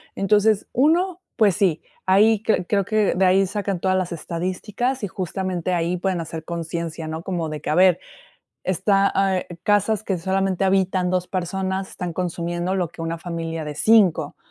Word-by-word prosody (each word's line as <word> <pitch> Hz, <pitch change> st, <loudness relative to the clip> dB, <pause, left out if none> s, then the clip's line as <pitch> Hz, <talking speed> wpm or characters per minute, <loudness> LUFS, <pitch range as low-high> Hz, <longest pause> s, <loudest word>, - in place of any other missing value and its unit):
Entonces, 210 Hz, +1 st, +2 dB
uno, 345 Hz, +7 st, +2 dB
pues 205 Hz, -6 st, +3 dB
sí, 175 Hz, -5 st, +1 dB, 0.2 s
ahí, 205 Hz, +3 st, +5 dB
creo 200 Hz, -2 st, +1 dB
que 215 Hz, -2 st, +2 dB
de 190 Hz, +2 st, +3 dB
ahí 190 Hz, +1 st, +4 dB
sacan 200 Hz, -1 st, -3 dB
todas 185 Hz, +1 st, +1 dB
las 185 Hz, -1 st, -2 dB
estadísticas, 185 Hz, +10 st, -3 dB
y -, -, 0 dB
justamente 185 Hz, -1 st, -3 dB
ahí 170 Hz, +1 st, 0 dB
pueden 185 Hz, 0 st, -1 dB
hacer 160 Hz, -1 st, -6 dB
conciencia, 165 Hz, -1 st, -4 dB
¿no?, 160 Hz, +1 st, -4 dB
como 170 Hz, -3 st, -3 dB
de 155 Hz, -1 st, -6 dB
que -, -, -5 dB
a 150 Hz, -, +1 dB
ver, 180 Hz, -1 st, +5 dB, 0.7 s
está, 195 Hz, +2 st, +2 dB
ah, 195 Hz, -1 st, +2 dB
eh, -, -, -6 dB
casas 205 Hz, +1 st, +2 dB
que 195 Hz, -3 st, -1 dB
solamente 190 Hz, +1 st, 0 dB
habitan 190 Hz, -1 st, +1 dB
2 180 Hz, -1 st, 0 dB
personas, 190 Hz, +1 st, -2 dB
están 175 Hz, -2 st, -5 dB
consumiendo 175 Hz, +1 st, -2 dB
lo 180 Hz, -3 st, 0 dB
que 165 Hz, -, -9 dB
una 165 Hz, 0 st, -3 dB
familia 165 Hz, -1 st, -4 dB
de 150 Hz, -1 st, -5 dB
5 175 Hz, -6 st, +3 dB
185 Hz, 175 wpm, -22 LUFS, 170-195 Hz, 0.7 s, ahí